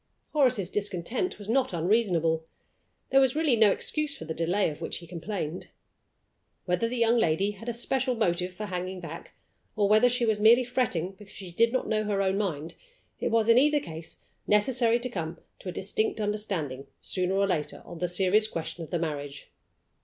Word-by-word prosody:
Horace's 250 - +2
discontent 210 - -2
was 205 -1 -10
not 250 -2 +1
unreasonable. 170 -3 +1 0.7
There 270 - +6
was 265 -1 +3
really 305 -5 +3
no 220 -2 +6
excuse 305 +5 0
for 160 - -8
the 160 - -4
delay 175 +5 +1
of 150 - -11
which - - -3
he 170 - -10
complained. 175 -1 -5 1.0
Whether 180 +5 +1
the 245 +2 -3
young 235 0 +3
lady 195 +1 +2
had 210 +4 -8
a - - -2
special 255 +2 0
motive 180 -4 0
for 210 +4 -6
hanging 185 -1 -4
back, 165 -1 -9 0.4
or 205 -1 +2
whether 215 +4 +5
she 245 0 +1
was 220 -2 +1
merely 230 +4 +6
fretting 235 -8 -1
because 205 -2 -13
she 185 -3 -8
did 230 +6 +3
not 255 - -1
know 215 -1 +1
her 205 -1 0
own 195 0 +1
mind, 165 -6 -3 0.5
it - - 0
was, 225 -1 +2
in 230 +1 +7
either 295 +2 +4
case, 160 - -8 0.3
necessary 230 +2 +3
to 245 - -3
come 170 -7 -5 0.2
to 185 - -7
a - - -3
distinct 210 +4 -1
understanding, 195 -11 -3
sooner 185 0 -1
or 200 0 +3
later, 155 -6 -2
on 170 - -9
the 180 - 0
serious 190 +4 +3
question 165 -2 -5
of 160 - -9
the 175 - -1
marriage. 145 -3 -5
200 Hz, 190 wpm, -28 LUFS, 175-230 Hz, 1.0 s, in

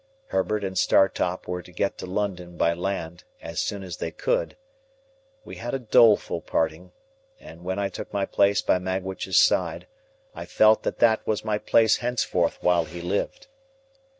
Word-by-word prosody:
Herbert 100 +2 -1
and 95 -1 -4
Startop 90 -1 +2
were 90 0 -3
to 90 - -16
get 100 +2 -2
to - - -6
London 90 -3 -4
by 85 - +2
land, 85 -1 -4 0.2
as 85 -1 -4
soon 100 -2 -3
as 90 -2 -7
they - - -3
could. - - -2 0.9
We - - -9
had 120 +3 -4
a - - -2
doleful 115 -2 +4
parting, 80 +3 -2 0.5
and 85 +2 -13
when 95 +1 -3
I 100 -1 0
took - - -8
my 100 -1 -1
place 100 +1 +2
by 90 - +2
Magwitch's 95 +1 -2
side, - - +2 0.5
I - - -7
felt 110 0 +4
that - - -3
that 110 -2 +3
was 110 0 -1
my 105 -1 0
place 110 0 +3
henceforth 120 -8 -1
while 85 -2 +3
he 85 +3 -9
lived. 90 +4 -3
95 Hz, 170 wpm, -25 LUFS, 90-105 Hz, 0.9 s, doleful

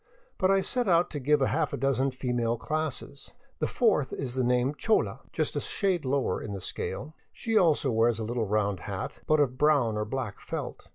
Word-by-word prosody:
But 185 - +3
I 195 0 +4
set 245 +4 0
out 175 -1 +3
to 145 - -4
give 145 +1 +3
a - - +2
half - - -1
dozen 135 0 +1
female 125 -3 -1
classes. 140 0 -4 0.3
The - - +1
fourth 210 - +2
is 130 -3 -4
the 130 - 0
same 125 +3 +2
chola, 220 +8 +1
just - - -1
a - - 0
shade 185 -6 0
lower 135 +1 0
in 100 - -5
the 100 - -4
scale. 145 - -5 0.2
She 225 -1 -3
also 155 -8 +4
wears 115 0 +3
a 115 - -3
little 115 0 -2
round 100 -2 0
hat, - - -5
but 155 0 +4
of 130 -3 +1
brown 140 -8 +3
or 105 - -1
black 115 -2 -4
felt. - - -6
135 Hz, 205 wpm, -28 LUFS, 120-155 Hz, 0.3 s, I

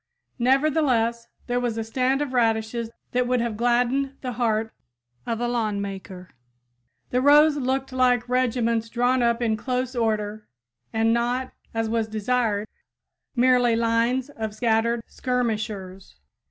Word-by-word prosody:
Nevertheless, 255 -3 +2 0.2
there 245 0 0
was 240 -2 -2
a 225 - -1
stand 255 +5 0
of 270 -3 -6
radishes 225 -1 0 0.2
that 250 0 +1
would 250 0 +1
have 235 -2 -2
gladdened 245 +4 +1
the 255 - -3
heart 225 -2 -1 0.5
of 230 -1 -1
a 240 - 0
lawn 220 -4 -1
maker! 190 -2 -7 0.8
The 250 - +2
rows 295 +2 +6
looked 265 0 -1
like 250 -1 +2
regiments 235 -2 0
drawn 245 +2 +1
up 235 0 +1
in 220 -2 +1
close 255 +2 -2
order 215 -2 -1 0.4
and 225 0 +2
not, 245 +2 -1 0.2
as 225 0 -1
was 225 0 0
desired, 215 -1 0 0.7
merely 245 -1 +4
lines 235 +4 +1
of 220 -5 -5
scattered 230 +1 +1
skirmishers. 215 -6 -3
235 Hz, 135 wpm, -24 LUFS, 225-250 Hz, 0.8 s, rows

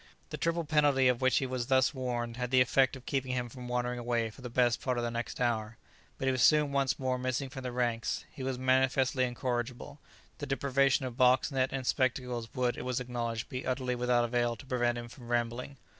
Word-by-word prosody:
The - - -4
triple 165 0 0
penalty 145 -4 +3
of 125 0 0
which 130 -2 +3
he 135 - +1
was 125 -2 -3
thus 130 +1 +3
warned 120 -3 -3
had 125 -1 -2
the 130 0 +4
effect 130 +1 +3
of 130 -2 -12
keeping 130 -2 -1
him 125 -1 -2
from 125 +1 -9
wandering 125 0 -1
away 120 -2 -1
for 130 - -15
the 125 - -6
best 120 -1 +2
part 125 -2 -1
of 120 - -1
the 120 - -1
next 120 +1 -4
hour, 115 -2 -1 0.4
but 135 - -2
he - - +4
was 130 -2 -1
soon 150 0 +5
once 140 -1 +1
more 130 -1 -1
missing 130 +2 -2
from 135 -2 -7
the 125 -1 -4
ranks; 120 -2 -1
he - - -10
was 130 -1 -2
manifestly 130 0 +2
incorrigible; 125 +2 -4 0.4
the 145 - -4
deprivation 135 0 +2
of 125 -2 -6
box, 130 +3 +4
net, 130 -1 +1
and 135 -1 -3
spectacles 125 -3 -1
would, 125 -1 0
it - - -4
was 125 0 -1
acknowledged, 120 -2 -3
be 130 0 -5
utterly 130 -1 -1
without 125 0 +2
avail 120 0 0
to 125 - -13
prevent 120 -2 0
him 120 0 -6
from 120 0 -13
rambling. 120 +3 -2
125 Hz, 225 wpm, -31 LUFS, 120-130 Hz, 0.4 s, soon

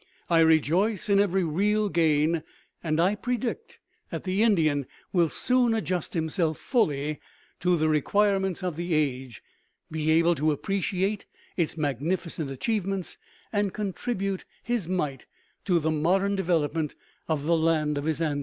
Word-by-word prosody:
I 165 - +5
rejoice 165 +7 +3
in 200 0 +5
every 195 -2 +2
real 205 +6 +1
gain; 160 -2 +2 0.4
and 155 -1 0
I 180 +4 +3
predict 250 - -3 0.3
that - - -5
the 190 +2 0
Indian 155 - +2 0.3
will 170 -3 +3
soon 250 +2 +2
adjust 185 -7 -2
himself 160 0 0
fully 150 - 0 0.4
to 180 -1 +2
the 155 0 +1
requirements 190 +4 +1
of 175 -4 -2
the 170 -1 -1
age, 130 -5 -2 0.5
be 155 0 -1
able 165 +2 +4
to 155 0 +1
appreciate 195 +4 -1 0.3
its 165 -2 -1
magnificent 155 +2 -2
achievements, 195 - -2 0.3
and 205 -2 0
contribute 195 -1 -2 0.2
his 235 -7 -1
mite 150 -8 -2 0.4
to 180 -3 +3
the 160 -1 0
modern 190 +6 +1
development 165 -4 0 0.3
of 155 -3 -1
the 170 +3 +2
land 160 -2 +1
of 145 0 -3
his 160 0 -1
ancestors. 150 -3 0
170 Hz, 145 wpm, -27 LUFS, 155-195 Hz, 0.5 s, I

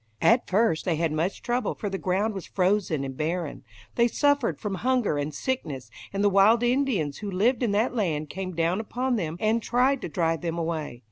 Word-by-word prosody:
At 235 +2 +4
first 205 -4 +2
they 175 -4 0
had 165 0 0
much 160 +5 -2
trouble, 240 -2 -1
for 210 - -4
the 195 -1 -3
ground 200 +4 0
was 195 -3 -7
frozen 185 -6 +1
and 135 -1 -5
barren. 160 +1 -3 0.3
They 235 0 +3
suffered 285 0 +1
from 210 -3 -3
hunger 245 - +1
and 145 +1 -2
sickness, 145 - -4 0.2
and 200 +1 -1
the - - +5
wild 205 +5 +5
Indians 240 - +1
who 210 - -5
lived 220 +7 +1
in 240 - +1
that 220 +5 +1
land 160 -10 -1
came 185 +1 -5
down 170 +4 +1
upon 245 +3 -1
them 165 -6 -3
and 220 +2 +1
tried 250 +4 +2
to - - -4
drive 165 -3 0
them 170 -1 -3
away. 160 -7 -3
195 Hz, 205 wpm, -26 LUFS, 165-235 Hz, 0.3 s, the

